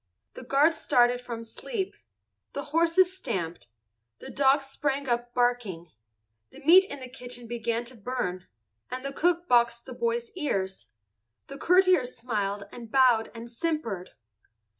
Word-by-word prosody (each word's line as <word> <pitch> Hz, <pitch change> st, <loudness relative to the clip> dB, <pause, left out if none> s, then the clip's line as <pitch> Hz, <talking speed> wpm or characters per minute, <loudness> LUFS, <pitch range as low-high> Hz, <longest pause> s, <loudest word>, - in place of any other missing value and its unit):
The -, -, -9 dB
guards 285 Hz, +6 st, +3 dB
started 245 Hz, 0 st, +3 dB
from 235 Hz, -2 st, -6 dB
sleep. 385 Hz, -, -4 dB, 0.6 s
The 280 Hz, -, -3 dB
horses 340 Hz, +3 st, +3 dB
stamped, 180 Hz, -, -4 dB, 0.5 s
the -, -, -9 dB
dogs 275 Hz, 0 st, +3 dB
sprang 275 Hz, 0 st, -2 dB
up 240 Hz, 0 st, -1 dB
barking. 235 Hz, -9 st, 0 dB, 0.6 s
The -, -, -14 dB
meat 370 Hz, +4 st, +8 dB
in 285 Hz, -7 st, -8 dB
the 255 Hz, -, -6 dB
kitchen 245 Hz, -1 st, -9 dB
began 235 Hz, 0 st, -2 dB
to 255 Hz, +2 st, -11 dB
burn, 205 Hz, -6 st, -4 dB, 0.4 s
and 255 Hz, +1 st, -5 dB
the 275 Hz, -, -2 dB
cook 345 Hz, +3 st, +1 dB
boxed 235 Hz, -1 st, +3 dB
the -, -, -8 dB
boy's 470 Hz, -1 st, -2 dB
ears. 195 Hz, -, -2 dB, 0.6 s
The 275 Hz, -, -9 dB
courtiers 360 Hz, -9 st, +3 dB
smiled 205 Hz, -4 st, -2 dB
and 235 Hz, -2 st, -10 dB
bowed 250 Hz, -4 st, +4 dB
and 230 Hz, +1 st, -8 dB
simpered. 235 Hz, -, -3 dB
250 Hz, 140 wpm, -27 LUFS, 230-300 Hz, 0.6 s, meat